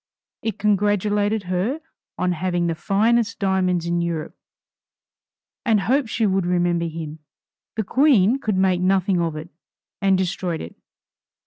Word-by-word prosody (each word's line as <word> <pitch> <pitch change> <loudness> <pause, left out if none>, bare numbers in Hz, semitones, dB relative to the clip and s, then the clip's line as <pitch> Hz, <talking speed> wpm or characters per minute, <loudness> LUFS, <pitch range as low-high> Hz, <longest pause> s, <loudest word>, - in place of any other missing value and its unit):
It 220 - -3
congratulated 205 +1 +1
her 185 - -1 0.4
on 180 0 0
having 175 0 -1
the 170 - 0
finest 220 +7 +1
diamonds 185 -4 +1
in 170 0 0
Europe, 165 -2 -3 1.3
and 220 -5 +2
hoped 260 +2 +1
she 225 - 0
would 190 -3 +1
remember 175 -1 +1
him. 160 -1 -7 0.6
The 220 - -1
Queen 250 -1 +3
could 215 -7 -1
make 185 -1 +2
nothing 185 -1 +2
of 165 -2 -1
it, 155 +2 -7 0.5
and 195 -1 +3
destroyed 180 -2 -2
it. 80 - -8
190 Hz, 135 wpm, -22 LUFS, 175-210 Hz, 1.3 s, Queen